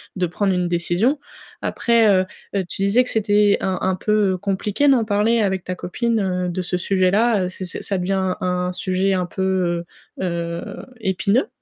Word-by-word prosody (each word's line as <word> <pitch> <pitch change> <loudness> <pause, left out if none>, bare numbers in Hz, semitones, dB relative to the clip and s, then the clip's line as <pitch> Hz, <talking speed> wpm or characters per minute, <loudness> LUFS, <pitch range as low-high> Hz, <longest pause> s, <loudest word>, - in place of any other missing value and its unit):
de 185 -2 0
prendre 195 +3 0
une 180 -1 0
décision. 175 - +1 0.4
Après, 235 -2 +2
heu, 190 -2 +4 0.4
tu 195 - -3
disais 205 +6 +4
que 250 - -8
c'était 205 -1 +3
un 190 -1 -1
un 190 0 +1
peu 205 -1 +1
compliqué 200 +7 0
d'en 260 -5 +4
parler 215 +3 +2
avec 190 -3 0
ta 185 - -4
copine, 230 +6 -1
heu, 180 -2 -1
de 180 +1 -2
ce 180 0 -2
sujet-là, 195 +3 +2
c'est 185 0 -7
c'est 180 - -6
ça 195 - -1
devient 190 0 0
un 180 0 -1
sujet 185 +1 0
un 185 -1 0
peu, 180 -2 -1 0.4
heu - - -2
heu, 170 -1 -4 0.2
épineux? 200 - +1
190 Hz, 175 wpm, -21 LUFS, 180-210 Hz, 0.4 s, heu